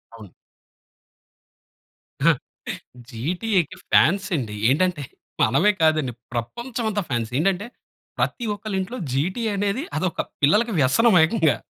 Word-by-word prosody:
అవును. 105 Hz, -5 st, -13 dB, 2.8 s
జీటీఏకి 175 Hz, -, -1 dB
ఫ్యాన్స్ 195 Hz, +4 st, +4 dB
అండి 110 Hz, -5 st, -4 dB
ఏంటంటే, 170 Hz, +2 st, +1 dB, 0.4 s
మనమే 140 Hz, -, +4 dB
కాదండి 155 Hz, -5 st, +2 dB, 0.2 s
ప్రపంచం 235 Hz, -, -4 dB
అంతా 205 Hz, -1 st, -1 dB
ఫ్యాన్స్. 115 Hz, -2 st, -2 dB
ఏంటంటే, 195 Hz, +5 st, 0 dB, 0.5 s
ప్రతి 240 Hz, -, -1 dB
ఒక్కళ్ళింట్లో 205 Hz, +2 st, -4 dB, 0.2 s
జీటీఏ 185 Hz, -, -1 dB
అనేది, 205 Hz, +7 st, -1 dB
అదొక 180 Hz, +1 st, -1 dB, 0.2 s
పిల్లలకి 210 Hz, +10 st, +3 dB
వ్యసనం 205 Hz, -, +4 dB
ఏకంగా. 160 Hz, -, +2 dB
180 Hz, 100 wpm, -23 LUFS, 135-210 Hz, 2.8 s, ఫ్యాన్స్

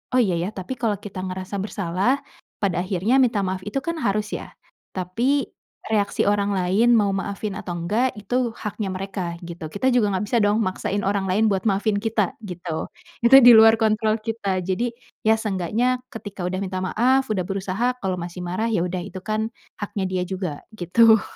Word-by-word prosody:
“Oh, 255 Hz, -, +6 dB
iya, 180 Hz, -6 st, +1 dB
ya, 180 Hz, +4 st, -1 dB
tapi 215 Hz, +7 st, -6 dB
kalau 220 Hz, -4 st, +1 dB
kita 190 Hz, -1 st, -8 dB
ngerasa 185 Hz, +2 st, -4 dB
bersalah, 200 Hz, +6 st, 0 dB, 0.4 s
pada 185 Hz, -3 st, +1 dB
akhirnya 195 Hz, +8 st, +1 dB
minta 230 Hz, -6 st, +3 dB
maaf 185 Hz, 0 st, -3 dB
itu 240 Hz, +7 st, -2 dB
kan 335 Hz, -1 st, -3 dB
harus 210 Hz, -1 st, 0 dB
ya.” -, -, -8 dB, 0.4 s
Tapi 235 Hz, +10 st, 0 dB, 0.4 s
reaksi 205 Hz, -2 st, +1 dB
orang 205 Hz, 0 st, +2 dB
lain 200 Hz, +7 st, +3 dB
mau 200 Hz, -2 st, +2 dB
maafin 200 Hz, +1 st, -3 dB
atau 180 Hz, -4 st, -5 dB
nggak 215 Hz, +8 st, 0 dB
itu 245 Hz, +4 st, 0 dB
haknya 210 Hz, -2 st, -4 dB
mereka 185 Hz, -2 st, -4 dB
gitu. 170 Hz, -2 st, -7 dB
Kita 255 Hz, +9 st, +1 dB
juga 220 Hz, -4 st, +3 dB
nggak 210 Hz, -, -1 dB
bisa 235 Hz, +3 st, +1 dB
dong 205 Hz, +1 st, +3 dB
maksain 190 Hz, +2 st, -2 dB
orang 195 Hz, -1 st, 0 dB
lain 210 Hz, +4 st, +3 dB
buat 190 Hz, -1 st, +1 dB
maafin 200 Hz, +1 st, +1 dB
kita, 220 Hz, -4 st, 0 dB
gitu. 175 Hz, -5 st, -5 dB, 0.3 s
Itu 240 Hz, +3 st, +8 dB
di 245 Hz, -1 st, +10 dB
luar 225 Hz, 0 st, +8 dB
kontrol 215 Hz, 0 st, +2 dB
kita. 205 Hz, -4 st, -2 dB
Jadi, 195 Hz, +6 st, 0 dB, 0.4 s
ya 220 Hz, -, +6 dB
seenggaknya 220 Hz, +5 st, 0 dB
ketika 205 Hz, -4 st, -8 dB
udah 185 Hz, +1 st, -2 dB
minta 185 Hz, -1 st, -3 dB
maaf, 255 Hz, +7 st, +2 dB
udah 190 Hz, -4 st, 0 dB
berusaha, 195 Hz, +6 st, -1 dB
kalau 190 Hz, -2 st, -1 dB
masih 175 Hz, +1 st, -6 dB
marah, 185 Hz, +6 st, -1 dB
ya 175 Hz, -, +1 dB
udah, 185 Hz, +1 st, -3 dB
itu 190 Hz, -1 st, -7 dB
kan 215 Hz, +2 st, -1 dB, 0.3 s
haknya 200 Hz, -1 st, -2 dB
dia 185 Hz, -1 st, -1 dB
juga 185 Hz, -6 st, -4 dB
gitu. 220 Hz, +3 st, +5 dB
205 Hz, 185 wpm, -23 LUFS, 185-225 Hz, 0.4 s, di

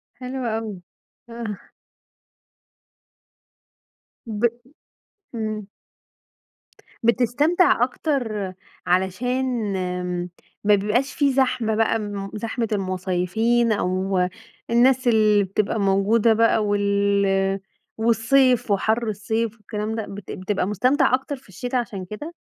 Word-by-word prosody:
حلو 255 Hz, 0 st, -5 dB
أوي، 220 Hz, -4 st, -3 dB, 0.5 s
آه. 230 Hz, -4 st, -7 dB, 2.6 s
ب 215 Hz, -3 st, -5 dB, 0.9 s
إمم. 215 Hz, -2 st, -3 dB, 1.4 s
بتستمتع 250 Hz, +7 st, +3 dB
أكتر 240 Hz, -, -2 dB, 0.3 s
علشان 225 Hz, +5 st, 0 dB, 0.9 s
ما 210 Hz, 0 st, +5 dB
بيبقاش 215 Hz, +7 st, 0 dB
في 280 Hz, -2 st, +2 dB
زحمة 255 Hz, -4 st, +1 dB
بقى 220 Hz, -1 st, 0 dB, 0.2 s
زحمة 230 Hz, +2 st, -2 dB
المصيفين، 190 Hz, +4 st, 0 dB
أو 190 Hz, -1 st, 0 dB, 0.5 s
الناس 250 Hz, +2 st, +4 dB
اللي 215 Hz, -3 st, +4 dB
بتبقى 200 Hz, +3 st, -1 dB
موجودة 205 Hz, +3 st, +3 dB
بقى، 225 Hz, -1 st, +3 dB
وال 200 Hz, -1 st, +1 dB, 0.4 s
والصيف 235 Hz, +2 st, +3 dB
وحر 220 Hz, +4 st, +1 dB
الصيف 220 Hz, +2 st, -2 dB
والكلام 210 Hz, +1 st, -4 dB
ده، 220 Hz, -2 st, -3 dB
بت 200 Hz, -1 st, -8 dB
بتبقى 190 Hz, 0 st, -2 dB
مستمتع 250 Hz, +8 st, +2 dB
أكتر 265 Hz, +2 st, 0 dB
في 260 Hz, -6 st, -19 dB
الشتا 245 Hz, +7 st, -3 dB
عشان 205 Hz, -6 st, -3 dB
كده؟ 255 Hz, -, -7 dB
220 Hz, 95 wpm, -23 LUFS, 200-245 Hz, 2.6 s, ما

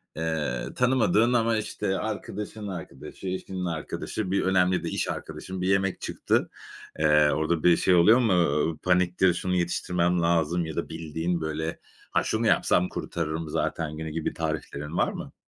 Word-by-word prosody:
eee, 80 Hz, -6 st, -2 dB
tanımadığın 125 Hz, -2 st, +3 dB
ama, 115 Hz, -2 st, +2 dB
işte, 95 Hz, -2 st, -2 dB
arkadaşının 105 Hz, 0 st, -5 dB
arkadaşı, 90 Hz, -1 st, -8 dB
eşinin 95 Hz, 0 st, -4 dB
arkadaşı, 90 Hz, +4 st, -4 dB
bir 100 Hz, -, +2 dB
önemli 90 Hz, -1 st, +2 dB
de -, -, -2 dB
iş -, -, -1 dB
arkadaşın 95 Hz, 0 st, -6 dB
bir 90 Hz, -, 0 dB
yemek 95 Hz, 0 st, +1 dB
çıktı. -, -, 0 dB, 0.5 s
Eee, 75 Hz, -1 st, +5 dB
orada 80 Hz, +1 st, 0 dB
bir 90 Hz, -1 st, +6 dB
şey 90 Hz, -, +3 dB
oluyor 110 Hz, +9 st, +6 dB
mu? 115 Hz, -6 st, +3 dB
Iıı, 80 Hz, -2 st, +2 dB
paniktir, 90 Hz, 0 st, +2 dB
şunu 90 Hz, +1 st, -2 dB
yetiştirmem 90 Hz, 0 st, +1 dB
lazım 85 Hz, 0 st, +1 dB
ya 80 Hz, -1 st, -6 dB
da -, -, -3 dB
bildiğin, 80 Hz, +1 st, -3 dB
böyle, 80 Hz, +1 st, -3 dB, 0.3 s
"Ha, -, -, +2 dB
şunu 110 Hz, +1 st, 0 dB
yapsam 90 Hz, -3 st, +3 dB
kurtarırım 80 Hz, -1 st, -4 dB
zaten 75 Hz, 0 st, -2 dB
günü." 80 Hz, 0 st, -4 dB
gibi 80 Hz, 0 st, -2 dB
tariflerin 80 Hz, -1 st, -4 dB
var -, -, +2 dB
mı? -, -, -7 dB
90 Hz, 160 wpm, -26 LUFS, 80-95 Hz, 0.5 s, bir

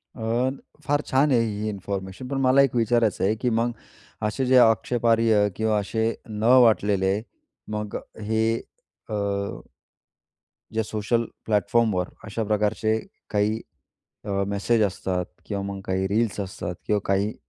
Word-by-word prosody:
अ, 120 Hz, +2 st, 0 dB, 0.3 s
फार 145 Hz, 0 st, +1 dB
छान 140 Hz, +3 st, +3 dB
आहे 125 Hz, -, +5 dB
ही 110 Hz, -2 st, -1 dB
इन्फॉर्मेशन, 100 Hz, +2 st, -5 dB
पण 140 Hz, -, -2 dB
मला 130 Hz, +1 st, +5 dB
एक 135 Hz, -3 st, +2 dB
विचारायचं 115 Hz, -3 st, +2 dB
आहे, 105 Hz, +3 st, +2 dB
की 125 Hz, +3 st, -1 dB
मग 115 Hz, +1 st, +1 dB, 0.6 s
असे 130 Hz, +5 st, -1 dB
जे 130 Hz, 0 st, +5 dB
आक्षेपार्ह 115 Hz, -2 st, +4 dB
किंवा 110 Hz, -1 st, +1 dB
असे 110 Hz, +3 st, -1 dB, 0.2 s
न 105 Hz, 0 st, -4 dB, 0.2 s
वाटलेले, 100 Hz, -2 st, +2 dB, 0.5 s
मग 105 Hz, -1 st, -4 dB, 0.2 s
हे 110 Hz, +1 st, 0 dB, 0.7 s
अ -, -, -4 dB, 1.6 s
जे 110 Hz, -, +1 dB
सोशल 110 Hz, +2 st, -1 dB, 0.2 s
प्लॅटफॉर्मवर 105 Hz, -3 st, +1 dB, 0.2 s
अशा 110 Hz, +1 st, -3 dB
प्रकारचे 105 Hz, +1 st, +1 dB, 0.3 s
काही 105 Hz, +2 st, +1 dB, 0.6 s
अ, 100 Hz, -1 st, 0 dB
मेसेज 100 Hz, +3 st, +1 dB
असतात 90 Hz, -2 st, -1 dB, 0.2 s
किंवा 100 Hz, -2 st, -3 dB
मग 100 Hz, 0 st, -5 dB
काही 95 Hz, 0 st, 0 dB
रील्स 110 Hz, +2 st, 0 dB
असतात, 95 Hz, -2 st, -4 dB
किंवा 105 Hz, -1 st, +2 dB
काही 100 Hz, +2 st, +1 dB
110 Hz, 135 wpm, -25 LUFS, 100-115 Hz, 1.6 s, आहे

